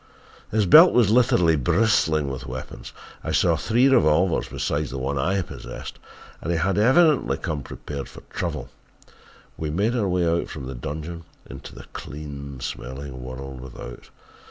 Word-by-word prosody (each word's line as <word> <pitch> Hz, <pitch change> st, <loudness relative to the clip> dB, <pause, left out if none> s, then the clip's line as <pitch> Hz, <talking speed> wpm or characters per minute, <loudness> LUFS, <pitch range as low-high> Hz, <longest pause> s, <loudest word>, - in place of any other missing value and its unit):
His 105 Hz, -1 st, +1 dB
belt 160 Hz, -, +8 dB
was 115 Hz, -5 st, +4 dB
literally 90 Hz, -9 st, +4 dB
bristling 80 Hz, -, +2 dB
with 65 Hz, -1 st, -5 dB
weapons 65 Hz, +1 st, -7 dB, 0.3 s
I -, -, -3 dB
saw -, -, +3 dB
three 120 Hz, +4 st, +3 dB
revolvers 95 Hz, -, +3 dB
beside 75 Hz, +1 st, -2 dB
the 65 Hz, -, -6 dB
one 70 Hz, +2 st, -2 dB
I 95 Hz, +6 st, +1 dB
possessed -, -, -9 dB, 0.4 s
and 85 Hz, -, -2 dB
he 85 Hz, -, +1 dB
had, 95 Hz, +4 st, +1 dB
evidently 145 Hz, +6 st, +4 dB
come 80 Hz, -5 st, -3 dB
prepared 70 Hz, 0 st, -7 dB
for -, -, -12 dB
trouble. -, -, -5 dB, 0.9 s
We 80 Hz, -, -3 dB
made 100 Hz, +10 st, 0 dB
our 105 Hz, -5 st, 0 dB
way 85 Hz, -2 st, +1 dB
from 70 Hz, -4 st, -8 dB
the 65 Hz, -, -6 dB
dungeon 80 Hz, +6 st, -6 dB, 0.2 s
into -, -, -10 dB
the -, -, -10 dB
clean 70 Hz, -2 st, -7 dB
smelling 65 Hz, 0 st, -6 dB
world 65 Hz, +1 st, -7 dB
without. 60 Hz, -1 st, -10 dB
80 Hz, 155 wpm, -24 LUFS, 70-100 Hz, 0.9 s, belt